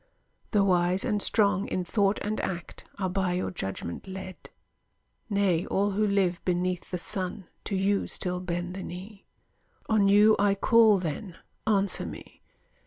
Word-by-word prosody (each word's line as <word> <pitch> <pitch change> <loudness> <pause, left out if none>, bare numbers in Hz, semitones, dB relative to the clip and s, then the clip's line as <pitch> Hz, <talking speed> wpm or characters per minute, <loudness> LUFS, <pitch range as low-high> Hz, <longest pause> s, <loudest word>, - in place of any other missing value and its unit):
The 205 -3 +3
wise 180 0 +2
and 210 -1 0
strong, 200 -1 +2
in 185 - -2
thought 200 +2 +1
and 210 +1 -2
act, 175 -2 -5
are 190 -2 -1
by 185 -1 0
Your 180 - -2
judgment 95 - -5
led; 190 -1 -8 0.8
nay 195 -5 +2
all 200 +1 +1
who 210 +2 +1
live 190 -3 +1
Beneath 180 0 -1
the 180 - -2
sun, 185 +1 -3 0.2
to 200 - -2
you 195 +1 +1
still 180 -1 -2
bend 175 0 -3
the 190 - -6
knee. 190 +3 -9 0.6
On 210 -3 +4
you 210 +2 +6
I 200 0 +3
call, 220 0 +5
then; 180 +1 -5 0.3
answer 200 -3 +1
me! - - -11
190 Hz, 155 wpm, -27 LUFS, 180-205 Hz, 0.8 s, you